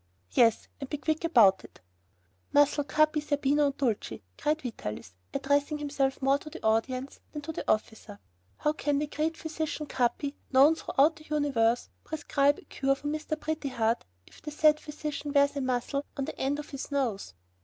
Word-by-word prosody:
"Yes, 230 -2 +3
and 275 - -6
be 295 - -2
quick 315 +3 -1
about 220 - +5
it!" - - -15 0.7
"Muzzle 290 0 +4
Capi, 310 +1 +3
Zerbino, 290 0 +2
and 280 - -3
Dulcie," 235 - -2
cried 310 - -1
Vitalis, 105 - -6 0.2
addressing 285 +2 +1
himself 280 -2 -1
more 275 +1 +3
to 305 - -10
the 330 - -10
audience 255 +5 0
than 295 -1 -6
to 320 - -4
the - - -1
officer; 215 -1 -3 0.4
"how 300 - +1
can 290 -2 0
the 295 - 0
great 310 +2 -2
physician, 315 -1 -4
Capi, 280 +2 -1 0.2
known 275 +4 +7
throughout 310 0 +2
the 310 - -15
universe, 255 -6 +1
prescribe 290 -2 +1
a - - -15
cure 275 -1 0
for 290 +1 -5
Mr. 310 +1 -3
Pretty 310 -2 -3
Heart, 230 -2 0 0.2
if - - -18
the 300 - -6
said 305 0 +4
physician 300 -1 -5
wears 285 0 +4
a 280 - -1
muzzle 260 +2 -1
on 275 - -1
the - - -7
end 275 +2 0
of 295 - -8
his 275 -1 -6
nose?" 235 - -2
285 Hz, 180 wpm, -29 LUFS, 260-300 Hz, 0.7 s, known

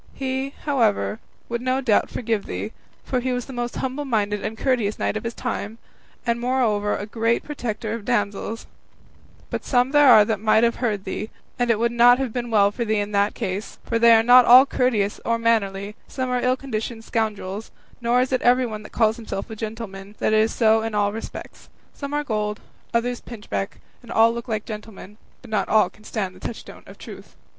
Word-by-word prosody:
He, 265 +1 -3
however, 230 -6 +1 0.3
no 255 +2 -1
doubt 240 -6 +3
would - - -22
forgive 225 -4 -2
thee, 215 - -4 0.3
for 255 - -1
he 255 +1 -2
was 245 -1 -3
the 270 - -9
most 240 -1 -3
humble 265 +3 -3
minded 210 -6 -1
and 220 - -4
courteous 235 -6 0
knight - - -1
of 215 - -3
his 230 0 -4
time, 225 -3 -4 0.5
and 235 0 0
moreover 235 -5 +1
a 205 - -5
great 230 +2 0
protector 230 -6 -4
of 230 -2 -5
damsels; 210 0 -2 0.9
but - - -3
some 250 0 +2
there 290 -2 +6
are 215 -4 +8
that 215 -1 -1
might 220 +1 +3
have 235 0 +2
heard 215 -6 -1
thee, 215 - -4 0.3
and 245 0 +1
it 230 - +3
would 235 +2 +1
not 240 +1 +6
have 260 -4 -3
been 240 -1 -3
well 205 -3 +4
for 235 - -3
thee 220 -1 0
in 205 0 -2
that 200 0 +1
case; 190 +3 -4
for 230 - -1
they 235 0 +7
are 225 0 +5
not 245 +2 +8
all 255 +3 +9
courteous 225 -7 0
or 230 0 +1
mannerly; 210 -3 0
some 255 -1 -3
are 250 0 0
ill 255 +1 +2
conditioned 225 -3 -5
scoundrels; 215 -2 -3 0.3
nor 240 +1 +3
is 255 - -1
it 255 - +1
everyone 245 -3 +2
that 210 - -12
calls 220 -1 +2
himself 225 -1 -6
a - - -5
gentleman, 215 -2 -7
that - - 0
is 220 +1 +3
so 220 -1 +3
in 225 -1 -3
all 205 0 +1
respects; 225 - -9 0.2
some 280 -1 -6
are 295 0 -1
gold, 210 -4 -2 0.3
others 240 +1 -1
pinchbeck, 210 -4 -5 0.2
and 240 - -12
all 225 +1 +5
look 235 0 -6
like 215 -2 -2
gentlemen, 210 -2 -9 0.3
but 240 - -13
not 215 - 0
all 215 - +4
can 215 - -21
stand 200 -4 -3
the - - -14
touchstone 230 - -8
of - - -13
truth. - - -11
225 Hz, 205 wpm, -23 LUFS, 210-245 Hz, 0.9 s, all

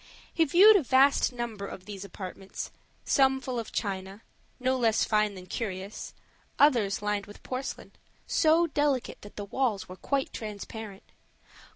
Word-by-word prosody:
He 330 - +3
viewed 380 +9 +8
a - - +2
vast 270 +1 +4
number 235 -5 -5
of 185 - -9
these 200 -1 -7
apartments, 190 0 -7 0.3
some 265 -1 +4
full 255 -2 -3
of 225 - -6
china, 195 0 -4 0.4
no 260 +1 +1
less 230 -3 +2
fine 210 -2 +1
than 185 -1 -10
curious; 195 0 -5 0.4
others 230 -9 +3
lined 205 -1 -1
with 205 - -13
porcelain, 260 +1 -5 0.3
so 325 +1 +4
delicate 290 -5 0
that 205 - -12
the 205 - -5
walls 220 -2 -1
were 185 - -9
quite 275 +7 -2
transparent. 210 -1 -7
220 Hz, 150 wpm, -28 LUFS, 200-265 Hz, 0.4 s, viewed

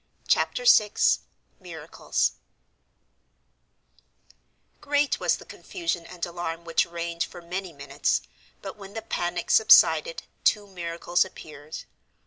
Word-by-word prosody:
Chapter - - +1
VI 210 - +6 0.7
MIRACLES 165 -4 -2 2.5
Great 290 0 +1
was - - +2
the - - -13
confusion 335 - -4
and 180 -1 -5
alarm 170 -1 -5
which 165 -1 +1
reigned 170 0 -3
for - - -9
many 180 +2 -5
minutes, 140 -2 -1 0.4
but - - -7
when 200 -1 -11
the 225 - -5
panic 175 -5 -2
subsided 475 - +5 0.2
two 210 -2 +3
miracles 175 -2 -1
appeared. 155 -5 -10
175 Hz, 110 wpm, -26 LUFS, 170-210 Hz, 2.5 s, VI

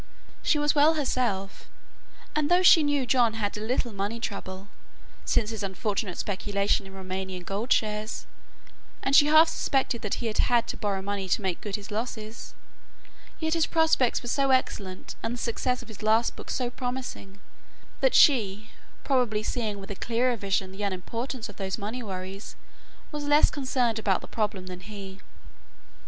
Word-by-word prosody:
She 310 - +2
was 295 0 +2
well 305 +2 +5
herself, 240 -9 -1 0.7
and 305 0 +1
though 355 +1 +5
she 345 -2 +8
knew 290 -3 +1
John 240 -3 +3
had 205 -2 -2
a 210 - -5
little 240 +1 -1
money 200 +4 -3
trouble, 195 -3 -5 0.6
since 215 -1 +1
his 220 -2 -5
unfortunate 195 -1 -2
speculation 200 0 0
in 190 - -12
Roumanian 190 -1 -5
gold 205 +7 -4
shares, 215 0 0 0.8
and 270 - +2
she 290 - +8
half 310 +2 +7
suspected 265 -6 0
that 210 - -1
he 240 - -5
had 220 -2 -2
had 240 -1 +3
to - - -2
borrow 200 -3 -2
money 200 -1 -3
to 210 - +2
make 185 -3 -2
good 205 -2 -3
his 205 0 -7
losses, 220 0 -5 0.8
yet 320 -1 0
his 330 -1 +2
prospects 320 -8 +2
were - - -6
so 275 +2 +1
excellent 200 -8 0
and 225 +2 -2
the - - -7
success 250 +2 -1
of - - -16
his 220 -3 -11
last 220 +2 +2
book - - -10
so 250 -2 -1
promising 245 -6 -5 0.6
that - - +3
she, 215 - +4 0.3
probably 245 -6 +1
seeing 215 -3 -2
with 195 +1 -8
a - - -4
clearer 240 +4 +1
vision 195 -3 -1
the 190 +2 -8
unimportance 230 +6 -3
of 205 - -12
those 190 -1 -2
money 225 +4 -4
worries, 190 -1 -6 0.6
was 295 -1 -4
less 290 +1 +5
concerned 255 -5 0
about 195 -4 +1
the - - -10
problem 210 -4 -2
than 180 -1 -7
he. 195 -1 -9
220 Hz, 175 wpm, -27 LUFS, 195-255 Hz, 0.8 s, she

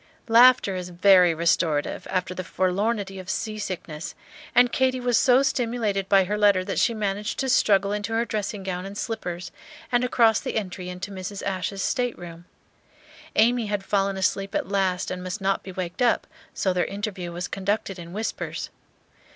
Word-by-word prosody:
Laughter 235 -3 +6
is 180 -1 -5
very 180 0 +5
restorative 165 -2 0
after 185 -1 -1
the 185 - -5
forlornity 195 +2 -1
of 185 0 -9
sea 215 -1 -3
sickness; 165 -6 -5 0.4
and 245 0 +6
Katy 260 -1 +1
was 245 -1 +1
so 260 +1 +5
stimulated 230 -7 -1
by 195 -1 +6
her 210 +3 -2
letter 200 -3 +4
that 200 - -1
she 230 - +2
managed 210 0 -2
to 265 - -1
struggle 200 -5 +3
into 205 +1 -3
her 230 +1 +1
dressing 210 -2 -3
gown 180 -1 -3
and 200 +1 -8
slippers 180 -7 -4 0.4
and 245 0 +3
across 230 -3 +4
the - - -5
entry 185 -4 -3
to 180 +2 -6
Mrs. 195 +1 -6
Ashe's 195 0 -2
stateroom. 175 -9 -3 0.9
Amy 230 +1 +3
had 205 -1 -2
fallen 195 -1 0
asleep 195 +1 -1
at - - -1
last 190 -2 0
and 180 0 -4
must 185 +3 -4
not 195 0 0
be 190 - -9
waked 180 +3 -5
up, 240 -2 +3 0.3
so 190 -3 0
their 180 - +1
interview 195 -3 -5
was 175 +2 -4
conducted 195 -1 -2
in 170 0 -9
whispers. 215 +4 -4
195 Hz, 175 wpm, -25 LUFS, 185-220 Hz, 0.9 s, Laughter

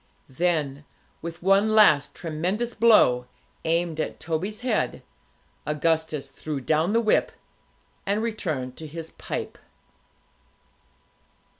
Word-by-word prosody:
Then, 145 -2 -1 0.4
with 170 +1 -7
one 200 +3 +4
last 155 -10 +5
tremendous 180 +9 -2
blow, 125 - +5 0.4
aimed 165 -1 0
at - - -3
Toby's 180 +7 -3
head, 250 - -1 0.6
Augustus 155 -2 0
threw 150 +1 -5
down 155 - +1
the 230 - +4
whip, 215 -2 +2 0.7
and 205 +3 0
returned 155 - -3
to 160 - -8
his 165 +1 -8
pipe. - - -6
165 Hz, 105 wpm, -25 LUFS, 150-205 Hz, 0.7 s, last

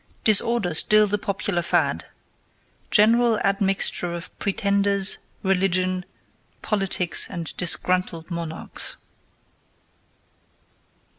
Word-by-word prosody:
DISORDER 215 -3 +2
STILL 215 +6 +6
THE 205 0 -2
POPULAR 200 -3 -3
FAD: 170 - -1 0.8
GENERAL 230 +1 +3
ADMIXTURE 195 -3 0
OF 170 +1 -10
PRETENDERS, 200 0 +1 0.2
RELIGION, 185 -1 0 0.6
POLITICS, 195 -4 +2
AND 170 -4 -6
DISGRUNTLED 180 -1 0
MONARCHS. 165 -1 -7
195 Hz, 75 wpm, -22 LUFS, 175-205 Hz, 0.8 s, STILL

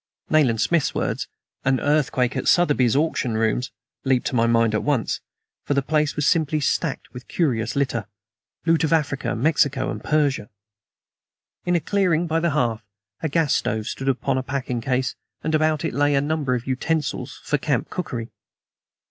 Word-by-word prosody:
Nayland 130 -8 +3
Smith's 160 +6 +1
words, - - -1 0.4
"an 130 -1 +2
earthquake 135 -4 +1
at - - -2
Sotheby's 145 -9 +4
auction 140 -6 0
rooms," 115 +3 0 0.3
leaped 130 -2 +1
to 130 - -1
my 115 -1 +3
mind 115 -1 +3
at 110 - +1
once; 140 -6 0 0.4
for 145 - -1
the 140 - +2
place 150 +1 +1
was 150 - 0
simply 155 -2 +2
stacked 140 - -1
with 125 +1 -10
curious 120 -10 0
litter 130 -6 -1 0.6
loot 165 -1 +3
of 160 - +1
Africa, 145 -4 0
Mexico 140 -4 +2
and - - -6
Persia. 145 -8 +1 1.2
In 175 - +3
a - - +4
clearing 175 -2 +1
by 165 0 0
the 170 +1 +1
hearth 120 -7 0 0.4
a 160 - -1
gas 155 -1 +2
stove 110 0 -1
stood 135 +3 -2
upon 130 0 0
a - - -1
packing 130 -2 -3
case, 130 +1 0 0.3
and 160 - -1
about 155 0 +2
it - - -2
lay 145 0 +2
a - - +4
number 145 -3 0
of 120 - -4
utensils 135 -1 -2
for 150 - 0
camp 140 -5 -1
cookery. 120 -10 -4
140 Hz, 175 wpm, -23 LUFS, 125-155 Hz, 1.2 s, Sotheby's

